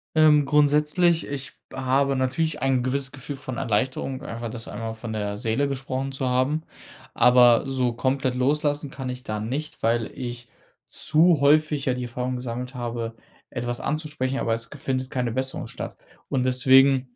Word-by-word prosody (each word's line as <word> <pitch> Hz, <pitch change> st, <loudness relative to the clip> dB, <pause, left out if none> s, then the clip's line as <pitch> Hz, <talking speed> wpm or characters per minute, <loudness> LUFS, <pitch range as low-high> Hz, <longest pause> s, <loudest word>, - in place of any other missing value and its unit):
Ähm, 150 Hz, -2 st, +6 dB
grundsätzlich, 150 Hz, +4 st, +3 dB
ich 140 Hz, +1 st, -6 dB, 0.2 s
habe 135 Hz, +1 st, +1 dB
natürlich 150 Hz, +4 st, -1 dB
ein 130 Hz, -2 st, +2 dB
gewisses 135 Hz, +1 st, -2 dB
Gefühl 140 Hz, +1 st, -7 dB
von 130 Hz, -3 st, -7 dB
Erleichterung, 130 Hz, +4 st, -1 dB
einfach 115 Hz, -3 st, -5 dB
das 115 Hz, 0 st, -5 dB
einmal 115 Hz, -1 st, -5 dB
von 110 Hz, 0 st, -7 dB
der 105 Hz, -1 st, -3 dB
Seele 120 Hz, +5 st, 0 dB
gesprochen 135 Hz, 0 st, -3 dB
zu 135 Hz, -1 st, -2 dB
haben. 130 Hz, +5 st, +1 dB, 0.5 s
Aber 125 Hz, -1 st, +6 dB
so 130 Hz, -3 st, 0 dB
komplett 130 Hz, +1 st, 0 dB
loslassen 145 Hz, +2 st, 0 dB
kann 130 Hz, -2 st, -5 dB
ich 125 Hz, 0 st, -6 dB
da 105 Hz, 0 st, -3 dB
nicht, 135 Hz, +8 st, -4 dB
weil 115 Hz, 0 st, +1 dB
ich 120 Hz, -1 st, -6 dB, 0.4 s
zu 160 Hz, +1 st, +3 dB
häufig 150 Hz, 0 st, +3 dB
ja 130 Hz, -1 st, +1 dB
die 125 Hz, -, -4 dB
Erfahrung 125 Hz, +1 st, -3 dB
gesammelt 125 Hz, +1 st, -5 dB
habe, 115 Hz, -2 st, -4 dB, 0.3 s
etwas 120 Hz, -1 st, -4 dB
anzusprechen, 150 Hz, -3 st, -2 dB
aber 115 Hz, -, 0 dB
es 115 Hz, 0 st, -4 dB
ge 150 Hz, -, -11 dB
findet 130 Hz, -1 st, -2 dB
keine 125 Hz, -3 st, -1 dB
Besserung 130 Hz, +2 st, -2 dB
statt. -, -, -7 dB, 0.3 s
Und 130 Hz, -2 st, +1 dB
deswegen, 130 Hz, 0 st, +4 dB
130 Hz, 165 wpm, -25 LUFS, 120-140 Hz, 0.5 s, Ähm